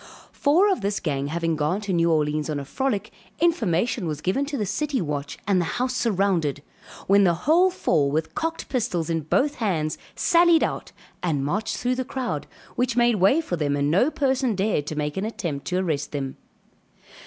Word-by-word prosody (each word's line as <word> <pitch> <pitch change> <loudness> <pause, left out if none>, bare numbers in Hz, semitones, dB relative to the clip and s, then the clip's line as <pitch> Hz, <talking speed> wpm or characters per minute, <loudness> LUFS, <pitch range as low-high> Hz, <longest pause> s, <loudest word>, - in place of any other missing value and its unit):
Four 350 +8 +3
of 320 - -1
this 200 +1 -1
gang 140 -4 -2
having 165 +1 -1
gone 155 +6 0
to 200 -2 -3
New 170 -1 +3
Orleans 150 0 0
on 150 -2 -1
a 140 - -6
frolic, 220 - -2 0.3
information 230 - +1
was 150 -2 -3
given 195 - 0
to 285 -1 -3
the 210 - -1
city 275 +7 -1
watch, 145 -4 -3
and 190 -3 +3
the 165 - -3
house 250 +1 0
surrounded, 185 - 0 0.4
when 200 +1 +5
the 175 -3 +3
whole 345 +6 +5
four 160 - +1
with 160 +2 -2
cocked 325 +1 -3
pistols 195 - -1
in 165 - +1
both 280 - +1
hands 160 -8 -1 0.2
sallied 340 -1 +4
out - - -3 0.3
and 150 -6 0
marched 210 +7 -1
through 250 +1 0
the 260 +1 -2
crowd 255 -1 -4 0.3
which 245 -1 0
made 240 -2 +4
way 200 - +4
for 180 - -3
them 145 -2 0
and 145 +1 +1
no 200 - +4
person 265 -6 0
dared 190 -7 0
to 155 - -4
make 150 +1 -2
an 190 - -1
attempt 170 -10 -4
to 180 0 0
arrest 155 -6 -2
them. 135 -2 -3
190 Hz, 195 wpm, -24 LUFS, 155-255 Hz, 0.4 s, when